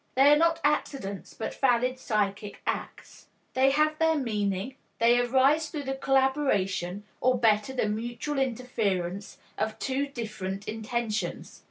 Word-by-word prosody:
They 275 +3 +7
are - - +7
not 330 +2 +3
accidents, 275 -9 -2
but 220 - -4
valid 255 0 +1
psychic 205 -3 -2
acts. - - -5 0.3
They 265 +1 +4
have 305 +2 +2
their 320 0 +3
meaning; 210 -1 -2 0.2
they 235 +1 +4
arise 270 +6 +3
through 295 -2 -5
the 270 0 -2
collaboration 265 -9 +1 0.2
or 255 0 +3
better, 220 0 +2
the 255 -5 0
mutual 240 +7 -3
interference 210 -7 -2 0.2
of 215 0 -1
two 275 +1 -1
different 215 -7 -5
intentions. 220 -3 -3
245 Hz, 135 wpm, -28 LUFS, 210-270 Hz, 0.3 s, They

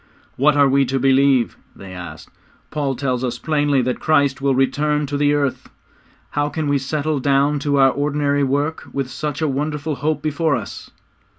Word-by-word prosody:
'What 145 +3 +3
are 140 -1 +5
we 135 +1 +3
to 135 +2 -1
believe?' 135 -2 +3 0.2
they 95 -1 -11
had 90 - -8
asked. - - -15 0.4
'Paul 140 -3 -1
tells 130 -1 -2
us 120 -2 -2
plainly 145 -2 +1
that 125 +1 -2
Christ 140 -4 +2
will 135 -1 +2
return 150 +3 +1
to 145 +1 -4
the 145 0 +2
earth. 140 -2 -2 0.6
How 145 0 0
can 155 0 -3
we 145 -1 +2
settle 150 +2 -2
down 140 +2 +2
to 145 0 0
our 135 -1 +5
ordinary 145 0 0
work 145 +4 -1
with 135 -2 -3
such 150 0 -4
a - - +2
wonderful 150 +1 -2
hope 155 +3 -1
before 155 0 0
us?' 110 -5 -7
140 Hz, 185 wpm, -20 LUFS, 135-150 Hz, 0.6 s, are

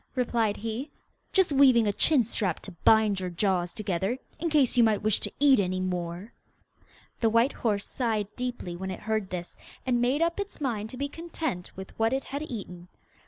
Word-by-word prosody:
replied 230 -4 +1
he. 230 +6 -4 0.4
'Just 380 -5 +3
weaving 265 -5 +6
a 205 - +1
chin 280 +4 +4
strap 200 -5 -2
to 195 - -10
bind 210 +3 +3
your 185 -1 -3
jaws 175 -1 0
together, 195 +2 -2 0.2
in 335 - -1
case 290 -6 +3
you 240 - +6
might 215 -2 +2
wish 215 -1 +3
to - - -2
eat 275 -3 +6
any 185 -1 0
more!' 180 +2 -4 0.9
The 225 - +3
white 230 +5 +3
horse 205 -4 -1
sighed 215 -5 -2
deeply 245 -8 -4
when 190 +2 -5
it 185 - -6
heard 215 -3 -1
this, 175 -1 -6 0.3
and 245 -2 +1
made 265 +6 +2
up 335 +3 0
its 405 0 -5
mind 225 -7 -2
to 255 - -8
be 280 +2 -1
content 315 - -5
with 190 0 -8
what 225 +2 +2
it 270 0 -1
had 280 +2 -5
eaten. 190 - -7
220 Hz, 195 wpm, -28 LUFS, 190-260 Hz, 0.9 s, weaving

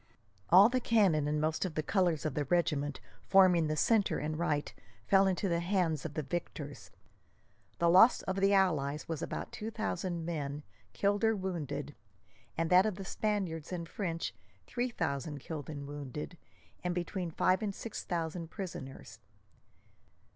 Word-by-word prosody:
All 190 +4 +9
the 255 +2 +1
cannon 195 -11 +3
and 150 0 0
most 155 +1 0
of 180 -5 -4
the 155 - -1
colours 175 -4 +1
of 155 - -1
the 145 +1 -1
regiments 145 -3 0 0.3
forming 185 -4 +5
the 155 - -1
centre 210 +6 +2
and 155 +1 -3
right 150 -4 -1 0.3
fell 195 - +5
into 190 +1 0
the 170 -2 +1
hands 170 -4 0
of 150 -2 -5
the 155 - -1
victors. 145 -1 -5 0.9
The 170 - +2
loss 190 +8 +6
of 190 - -2
the 195 +1 +3
allies 155 -7 +2
was 160 -3 -3
about - - -4
two 215 - -5
thousand 185 -6 -3
men, 150 -3 -3 0.3
killed 205 +2 +1
or 225 0 +4
wounded; 150 -7 -4 0.6
and 165 +1 0
that 185 +3 +6
of 210 - -2
the 195 0 -7
Spaniards 190 -7 -2
and 170 -2 -4
French 165 -3 -3 0.3
three 250 +1 -2
thousand 145 - -3
killed 150 +1 -6
and 145 -2 -6
wounded, 145 +3 -6 0.5
and 180 -1 -1
between 180 0 -3
five 185 +4 +2
and 200 -3 -2
six 230 - -6
thousand 165 -1 -3
prisoners. 135 - -8
170 Hz, 160 wpm, -32 LUFS, 150-190 Hz, 0.9 s, All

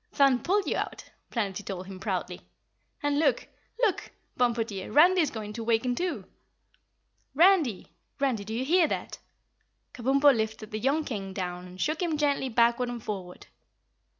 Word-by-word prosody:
"Thun 275 -3 +4
pulled 390 - +1
you - - -1
out," - - -5 0.2
Planetty 205 -4 -2
told 190 -2 -6
him 190 0 -9
proudly. 195 - -3 0.6
"And 290 0 +1
look, 280 -6 +1 0.4
LOOK, 420 -6 +1 0.3
Bumpo 235 -2 +2
dear, 200 -4 -7
Randy 355 +5 +6
is 305 - +1
going 215 -3 -6
to 230 - -5
waken, 230 +2 +1
too." 355 +6 -3 1.1
"Randy! 325 - +3 0.3
Randy, 260 -7 0
do 210 - -8
you 255 +3 -1
hear 340 +3 +4
that?" - - -4 0.7
Kabumpo 275 +3 +4
lifted 220 -1 -3
the 215 - -3
young 280 +7 +1
King 195 -8 -5
down 180 -1 -4
and 180 +1 -13
shook 310 - -1
him 330 -4 0
gently 285 -3 +1
backward 235 +1 +2
and 240 -2 -6
forward. 185 -4 -6
245 Hz, 160 wpm, -28 LUFS, 210-290 Hz, 1.1 s, Randy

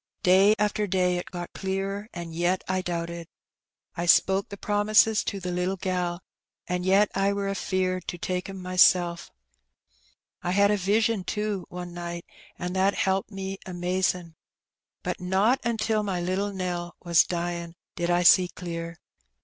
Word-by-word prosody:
Day 195 +3 +6
after 210 0 0
day 180 -1 +1
it 175 - -5
got 175 -2 -7
clearer^ 195 +2 -3
an' 170 -2 -7
yet 175 +3 0
I 185 0 0
doubted. 170 -1 -4 0.7
I 175 -1 -3
spoke 190 +3 +4
the 200 - -7
promises 210 +2 +3
to 200 - -3
the 180 -1 -4
little 180 +2 -1
gal^ 180 -2 -2 0.4
and 180 0 -2
yet 195 +2 +4
I 195 +1 +1
were 200 0 -2
afeard 185 -2 -1
to 175 - -4
take 180 +2 -3
'em 190 -1 -7
mysel'. 180 -1 +4 1.2
I 175 - -2
had 200 +1 +4
a - - +3
vision^ 210 +2 +1
too^ 210 -1 -2
one 180 -1 -7
night, 170 0 -6 0.3
an' 180 0 -4
that 190 +1 +2
helped 190 0 0
me 195 -1 -5
amazin'. 180 -1 -1 0.7
But - - -3
not 195 +8 +2
until 225 -2 0
my 195 -4 -2
little 185 +3 -1
Nell 175 -2 -4
was 170 -2 +5
dyin' 170 -1 -4 0.2
did 175 -1 -2
I 175 0 +3
see 180 +1 +7
clear. 170 -1 -6
185 Hz, 155 wpm, -26 LUFS, 175-195 Hz, 1.2 s, see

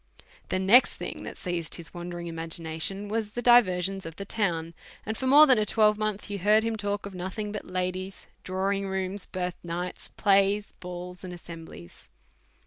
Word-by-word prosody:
The - - +1
next 195 +7 +6
thing - - -5
that - - -7
seized 175 -3 -3
his 170 -2 -10
wandering 175 0 -6
imagina 165 -1 -4
tion 195 +4 -1
was 215 0 -1
the 240 - -3
diversions 195 -6 +4
of 165 -2 -7
the 200 - -6
town; 170 -6 -1 0.3
and 220 - -2
for 260 - -2
more 290 +3 +9
than 260 -6 +5
a - - +3
twelvemonth 215 -1 +2
you 205 -1 -4
heard 210 +4 +4
him 225 0 -1
talk 205 -1 -2
of 200 - -7
nothing 190 +4 -4
but 210 - -6
ladies, 185 +1 -3 0.2
drawing 195 +1 -1
rooms, 190 0 -3
birth 180 -1 -3
nights, 175 +1 -4
plays, 200 0 +2
balls, 180 0 -8
and 180 -1 -6
as 175 - -10
semblies. 165 - -11
190 Hz, 180 wpm, -27 LUFS, 175-210 Hz, 0.3 s, more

